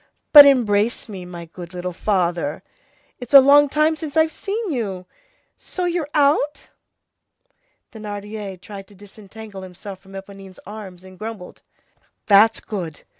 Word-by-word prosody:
But 290 Hz, -2 st, +12 dB
embrace 230 Hz, -4 st, +1 dB
me, 190 Hz, -4 st, -8 dB
my 175 Hz, -1 st, -9 dB
good 175 Hz, +1 st, -11 dB
little 180 Hz, 0 st, -5 dB
father! 175 Hz, -6 st, -1 dB, 0.6 s
It's 245 Hz, +2 st, -2 dB
a -, -, +13 dB
long 285 Hz, +2 st, +5 dB
time 305 Hz, +2 st, +1 dB
since 310 Hz, -1 st, -6 dB
I've 315 Hz, 0 st, +3 dB
seen 410 Hz, +1 st, -4 dB
you! 200 Hz, -9 st, -4 dB, 0.5 s
So 365 Hz, -, -5 dB
you're 345 Hz, -4 st, -2 dB
out?" 295 Hz, 0 st, +1 dB, 1.2 s
Thénardier 205 Hz, -2 st, -7 dB
tried 195 Hz, 0 st, -11 dB
to 205 Hz, -, -19 dB
disentangle 205 Hz, +1 st, -12 dB
himself 190 Hz, +1 st, -10 dB
from 195 Hz, 0 st, -18 dB
Éponine's 195 Hz, -1 st, -11 dB
arms, 195 Hz, -3 st, -10 dB
and 185 Hz, -1 st, -15 dB
grumbled:— 215 Hz, -4 st, -8 dB, 0.6 s
"That's 210 Hz, +2 st, +5 dB
good. 170 Hz, -8 st, -7 dB
205 Hz, 135 wpm, -21 LUFS, 185-275 Hz, 1.2 s, a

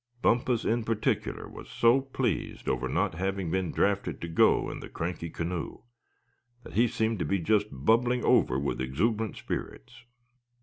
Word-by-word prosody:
Bumpus 120 Hz, 0 st, +2 dB
in 115 Hz, +1 st, +1 dB
particular 110 Hz, -1 st, -1 dB
was -, -, -11 dB
so 120 Hz, +3 st, +4 dB
pleased 130 Hz, -6 st, -3 dB
over -, -, 0 dB
not -, -, 0 dB
having 95 Hz, 0 st, -2 dB
been 95 Hz, -2 st, 0 dB
drafted 100 Hz, 0 st, 0 dB
to 85 Hz, -, -4 dB
go 80 Hz, -, +3 dB
in -, -, -6 dB
the -, -, -9 dB
cranky 85 Hz, 0 st, -4 dB
canoe 85 Hz, +1 st, -4 dB, 0.8 s
that -, -, -11 dB
he 120 Hz, +2 st, +4 dB
seemed 110 Hz, -1 st, -1 dB
to -, -, 0 dB
be 100 Hz, -, +1 dB
just 105 Hz, +3 st, +2 dB
bubbling 115 Hz, -, +2 dB
over 65 Hz, -, +4 dB
with 70 Hz, -1 st, -2 dB
exuberant 105 Hz, -, -1 dB
spirits. 125 Hz, +1 st, -6 dB
105 Hz, 160 wpm, -28 LUFS, 85-115 Hz, 0.8 s, so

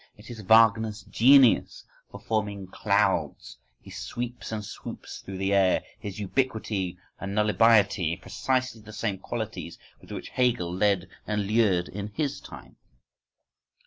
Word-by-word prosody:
It 110 Hz, +3 st, -12 dB
is 115 Hz, -2 st, -8 dB
Wagner's 110 Hz, 0 st, +4 dB
genius 130 Hz, +2 st, +4 dB, 0.2 s
for -, -, -10 dB
forming 105 Hz, -3 st, -2 dB
clouds, 95 Hz, -, -1 dB, 0.2 s
his -, -, -10 dB
sweeps 120 Hz, 0 st, -5 dB
and 105 Hz, -1 st, -4 dB
swoops -, -, -8 dB
through 95 Hz, -1 st, -8 dB
the 95 Hz, +1 st, 0 dB
air, 95 Hz, -2 st, +3 dB, 0.2 s
his 100 Hz, 0 st, -7 dB
ubiquity 105 Hz, -5 st, -2 dB, 0.2 s
and 100 Hz, 0 st, -5 dB
nullibiety—precisely 110 Hz, +3 st, +2 dB
the 110 Hz, 0 st, -12 dB
same 105 Hz, -2 st, -2 dB
qualities 110 Hz, -6 st, -5 dB, 0.2 s
with -, -, -16 dB
which -, -, -6 dB
Hegel 120 Hz, -9 st, 0 dB
led 95 Hz, -1 st, +1 dB, 0.2 s
and 105 Hz, -1 st, -1 dB
lured 100 Hz, -5 st, +2 dB
in 100 Hz, +1 st, -6 dB
his 145 Hz, -2 st, -2 dB
time! -, -, -12 dB
105 Hz, 130 wpm, -26 LUFS, 95-115 Hz, 0.2 s, Wagner's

